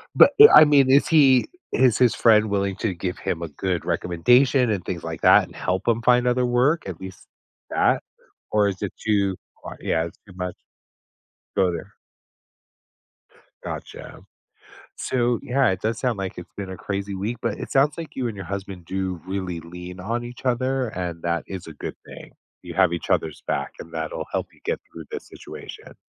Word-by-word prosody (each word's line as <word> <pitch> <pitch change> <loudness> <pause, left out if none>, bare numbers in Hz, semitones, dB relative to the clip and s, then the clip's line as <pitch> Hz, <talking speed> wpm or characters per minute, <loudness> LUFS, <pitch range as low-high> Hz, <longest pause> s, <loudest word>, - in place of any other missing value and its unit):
But, - - +8
e 435 - +13
I 155 - +10
mean, 140 -3 +4
is 140 +2 +5
he 135 -6 +5 0.3
is 125 -3 +3
his 125 -2 +4
friend 110 -2 +4
willing 100 -1 0
to 105 -3 -1
give 90 +1 -4
him 85 - -3
a 85 - -3
good 90 +4 -3
recommendation 125 +9 +3
and 100 -5 -1
things 85 -2 -4
like 80 -1 -6
that - - +7
and - - -16
help 95 +4 -2
him 115 0 +2
find 125 +1 +4
other 125 0 +2
work, 125 +4 +2
at 90 -4 -6
least 95 0 -10 0.4
that? - - +2 0.5
Or 105 -1 +3
is 95 0 -4
it 100 - -3
too 100 -3 +2 0.3
qu - - -7
yeah. 80 0 0
It's 85 - -10
too 95 - -13
much. 90 -1 -4 1.0
Go 95 -2 +3
there. 85 - -7 1.7
Gotcha. - - -8 0.8
So, 120 -2 0
yeah, 135 -3 +2
it 95 - -2
does 110 0 -1
sound 125 -6 -1
like 95 -2 -5
it's 90 - -10
been 100 -2 -5
a 95 - -6
crazy 100 +1 -4
week, 105 +5 -3
but 115 -3 -2
it - - -6
sounds 140 +2 +3
like 165 - -7
you 130 -2 -2
and 110 - -6
your 95 - -6
husband 95 -1 -6
do 95 -1 -3
really 95 -3 -3
lean 90 +2 -9
on 115 +5 -3
each 120 +1 -10
other, 130 +1 0
and 90 -4 -5
that 85 0 -1
is 95 -3 -7
a 80 - -8
good - - -6
thing. - - -12 0.3
You - - -8
have 95 -3 +4
each 85 - -4
other's 80 -2 0
back, 70 - -2
and 85 - -10
that'll 80 -1 -4
help - - -1
you - - -24
get - - -1
through 80 -1 -9
this - - -6
situation. - - -11
100 Hz, 195 wpm, -23 LUFS, 90-120 Hz, 1.7 s, e